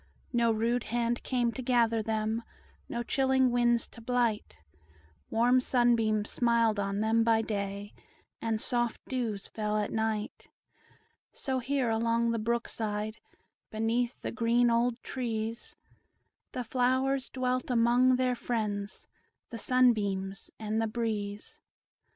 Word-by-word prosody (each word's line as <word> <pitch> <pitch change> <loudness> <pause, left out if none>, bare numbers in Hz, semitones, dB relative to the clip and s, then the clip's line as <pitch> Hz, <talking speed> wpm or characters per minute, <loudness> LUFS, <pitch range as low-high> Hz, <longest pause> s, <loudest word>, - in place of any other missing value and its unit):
No 235 -1 +3
rude 230 +2 0
hand 235 +1 -1
came 245 -2 0
to 260 - -6
gather 235 -3 +2
them, 220 +1 -1 0.5
No 235 0 -2
chilling 265 0 +2
winds 240 -1 +2
to 230 - -13
blight; 235 -2 0 0.7
Warm 245 +3 +4
sunbeams 230 -4 +2
smiled 230 -3 +2
on 200 0 -1
them 225 +1 +3
by 225 -1 +3
day, 200 -1 -4 0.5
And 225 -1 -1
soft 240 0 0
dews 230 -6 -2
fell 210 -1 -2
at 210 -1 -1
night. 220 -1 -2 0.9
So 265 -2 -2
here, 260 -1 0
along 230 +1 +1
the 230 - -1
brook 235 +2 -1
side, 215 0 -3 0.5
Beneath 230 +3 -1
the - - -2
green 235 0 +2
old 235 +1 +1
trees, 230 -3 -4 0.8
The 250 - -3
flowers 260 +2 +1
dwelt 255 0 -1
among 245 +2 +4
their 255 0 +1
friends, 210 -4 -3 0.4
The 230 - -6
sunbeams 205 -6 +1
and 220 0 -1
the 225 - +1
breeze. 215 -3 -4
230 Hz, 125 wpm, -30 LUFS, 220-245 Hz, 0.9 s, Warm